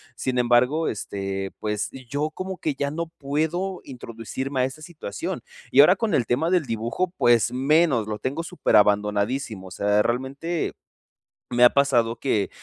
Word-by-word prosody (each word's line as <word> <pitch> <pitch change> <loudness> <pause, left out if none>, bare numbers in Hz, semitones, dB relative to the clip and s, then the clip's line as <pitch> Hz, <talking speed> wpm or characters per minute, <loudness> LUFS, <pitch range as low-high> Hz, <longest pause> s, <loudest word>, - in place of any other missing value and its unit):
Sin 125 -1 -1
embargo, 125 +6 +3
este, 95 -2 -4
pues, 105 -1 -2 0.2
yo 150 +2 -1
como 185 +2 -5
que 155 - -1
ya 140 +1 -1
no 170 +2 -3
puedo 160 +6 -2
introducirme 130 +2 -5
a - - +3
esta 135 +4 -7
situación. 155 - -6 0.3
Y 140 - +8
ahora 180 +6 +7
con 220 +2 -1
el 120 - +2
tema 150 +8 +1
del 175 -6 +2
dibujo, 120 +11 -2
pues 120 0 +3
menos, 135 -4 +3
lo 105 -1 -3
tengo 140 +8 -2
súper 180 +1 0
abandonadísimo. 105 +1 +1
O - - -12
sea, 105 +2 +2
realmente 135 +8 -2 0.8
me 120 0 +4
ha 120 - +8
pasado 120 -5 +2
que 110 -6 0
130 Hz, 160 wpm, -24 LUFS, 110-155 Hz, 0.8 s, Y